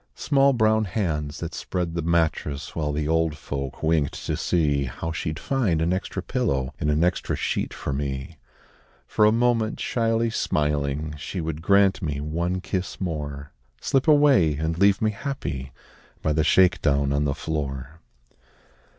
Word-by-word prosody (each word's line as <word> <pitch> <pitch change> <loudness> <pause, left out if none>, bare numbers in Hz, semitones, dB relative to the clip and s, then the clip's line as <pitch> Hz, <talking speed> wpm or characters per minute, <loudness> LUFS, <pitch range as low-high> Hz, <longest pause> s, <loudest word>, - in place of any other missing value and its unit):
Small 140 -2 +3
brown 110 -2 +3
hands 80 -7 -2
that 85 0 -4
spread 90 -3 -3
the 85 - -1
mattress 80 -3 -1
While 75 -2 -1
the 75 +1 -2
old 80 -1 +1
folk 70 0 -5
winked 80 -3 +1
to - - -1
see 75 -5 +1
How 80 +6 -5
she'd 80 -1 -3
find 105 -6 0
an 85 +2 +1
extra 95 0 -3
pillow 70 - -1
And 75 - 0
an 75 +2 +2
extra 90 +1 0
sheet - - -2
for 70 - -4
me. 70 +2 -4 0.7
For 105 - +2
a 105 - +6
moment 115 -1 +1
shyly 115 -1 0
smiling, 75 -4 -1
She 90 +6 -5
would 80 -1 -3
grant 100 +2 +4
me 75 -5 -2
one 85 +5 -2
kiss 95 0 -3
more 75 -5 -4 0.3
Slip 135 +2 +1
away 140 - +5
and 80 +2 -1
leave 100 +1 +4
me 110 - +3
happy 100 - -5 0.5
By 75 - +2
the 80 0 +2
shake 90 +3 +4
down 70 -2 +2
on 70 +1 +1
the 70 -1 0
floor. 70 -1 -4
80 Hz, 160 wpm, -24 LUFS, 75-100 Hz, 0.7 s, a